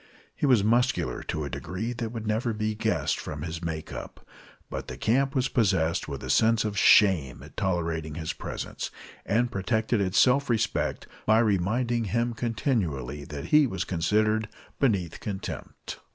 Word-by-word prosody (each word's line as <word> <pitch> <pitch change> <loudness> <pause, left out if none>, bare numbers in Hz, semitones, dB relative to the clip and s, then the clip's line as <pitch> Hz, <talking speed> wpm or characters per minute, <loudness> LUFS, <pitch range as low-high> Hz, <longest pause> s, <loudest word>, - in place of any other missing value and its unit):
He 145 - 0
was 120 -7 +5
muscular 115 - +1
to 75 - -3
a 70 - -4
degree 110 +7 -4
that 115 -1 -3
would 115 -2 -5
never 110 +2 0
be 110 0 -1
guessed 105 -10 0
from 75 -1 -6
his 80 +1 -5
make 80 -2 -4
up, - - -9 0.4
but - - -6
the - - -7
camp 135 +5 +1
was 130 -1 +2
possessed 95 - +1
with 70 -2 -6
a - - -6
sense 115 0 +3
of 105 -1 -2
shame 95 - +4
at - - -14
tolerating 80 -5 -1
his 80 0 -3
presence, - - -5 0.4
and 120 +3 +2
protected 110 +2 0
its 95 -1 0
self 135 +2 +4
respect 115 -3 0 0.2
by 110 +1 +6
reminding 115 +3 +1
him 120 +3 0
continually 90 - -2
that 75 +1 -7
he 150 -2 +7
was 95 -5 -2
considered 105 +5 +1 0.3
beneath 100 - +1
contempt. 100 -3 -6
105 Hz, 165 wpm, -27 LUFS, 85-115 Hz, 0.4 s, he